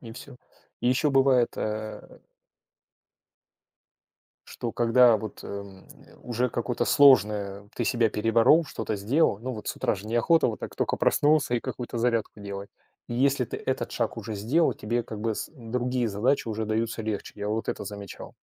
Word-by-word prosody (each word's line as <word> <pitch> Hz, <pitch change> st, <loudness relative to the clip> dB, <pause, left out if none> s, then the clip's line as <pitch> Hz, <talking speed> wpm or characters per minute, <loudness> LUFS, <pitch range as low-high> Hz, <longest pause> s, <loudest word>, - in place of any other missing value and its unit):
И 115 Hz, -2 st, -10 dB
всё. 125 Hz, +2 st, -11 dB, 0.4 s
И 120 Hz, -, +1 dB
ещё 135 Hz, +3 st, +2 dB
бывает, 135 Hz, -3 st, +4 dB
э 110 Hz, 0 st, -5 dB, 2.3 s
что 120 Hz, -, -5 dB
когда 120 Hz, 0 st, +5 dB
вот, 110 Hz, -1 st, -8 dB
эм, 100 Hz, -1 st, -9 dB, 0.3 s
уже 125 Hz, +1 st, -1 dB
какое-то 120 Hz, +1 st, -2 dB
сложное 105 Hz, -7 st, +4 dB
ты 120 Hz, -, -2 dB
себя 115 Hz, -2 st, +2 dB
переборол, 115 Hz, +9 st, +4 dB
что-то 110 Hz, -, -4 dB
сделал, 105 Hz, +3 st, +1 dB
ну 130 Hz, +2 st, -4 dB
вот 110 Hz, -3 st, -8 dB
с -, -, -2 dB
утра -, -, 0 dB
же 100 Hz, +3 st, -10 dB
неохота, 120 Hz, +9 st, +3 dB
вот 110 Hz, -, -3 dB
так -, -, -7 dB
тока -, -, 0 dB
проснулся 145 Hz, -4 st, +2 dB
и -, -, -2 dB
какую-то 120 Hz, -1 st, -5 dB
зарядку 115 Hz, -3 st, 0 dB
делать. 100 Hz, 0 st, -7 dB, 0.4 s
И 120 Hz, -, -4 dB
если 135 Hz, +1 st, +2 dB
ты -, -, -6 dB
этот -, -, -3 dB
шаг -, -, -2 dB
уже 110 Hz, +1 st, -5 dB
сделал, 130 Hz, +12 st, +2 dB
тебе 120 Hz, +3 st, -2 dB
как 110 Hz, -2 st, -8 dB
бы 110 Hz, -1 st, -1 dB
с -, -, -5 dB
другие 125 Hz, -1 st, -2 dB
задачи 115 Hz, +7 st, 0 dB
уже 110 Hz, 0 st, -2 dB
даются 110 Hz, +1 st, -2 dB
легче. 105 Hz, -2 st, -4 dB
Я 105 Hz, 0 st, -4 dB
вот 110 Hz, +1 st, -2 dB
это -, -, -3 dB
замечал. 100 Hz, -2 st, -9 dB
115 Hz, 170 wpm, -26 LUFS, 105-125 Hz, 2.3 s, когда